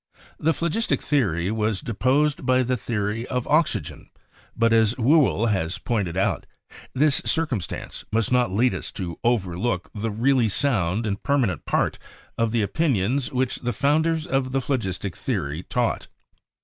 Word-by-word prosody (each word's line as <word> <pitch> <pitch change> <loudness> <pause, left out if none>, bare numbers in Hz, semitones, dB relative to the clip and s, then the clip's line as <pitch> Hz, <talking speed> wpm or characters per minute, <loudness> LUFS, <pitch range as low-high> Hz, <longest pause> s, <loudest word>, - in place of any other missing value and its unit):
The 160 - +2
Phlogistic 170 +8 0
Theory 95 - 0
was 110 -2 0
deposed 135 +7 +1
by 130 0 +3
the 125 +1 0
Theory 110 0 -2
of 125 -1 -2
Oxygen, 155 - 0 0.5
but, 115 0 +3
as 110 0 +4
Whewell 115 - +3
has 90 -3 -1
pointed 100 -7 -2
out, 95 - 0 0.5
"this 145 +1 +3
circum 155 - 0
stance - - -6
must 115 +1 0
not 125 -4 +3
lead 120 +6 +2
us - - -4
to 85 -4 -5
overlook 95 -3 0
the 110 +1 -3
really 120 +2 +2
sound 105 - +1
and 100 -2 -2
peimanent 125 - 0
part - - 0 0.4
of 115 -1 0
the 115 -2 +1
opinions 125 - 0
which 130 -1 0
the 120 0 -3
founders 155 +6 +1
of 135 -5 -1
the 135 - +2
phlogistic 100 - -2
theory 70 +4 -3
taught." 120 +4 -1
115 Hz, 150 wpm, -24 LUFS, 100-135 Hz, 0.5 s, as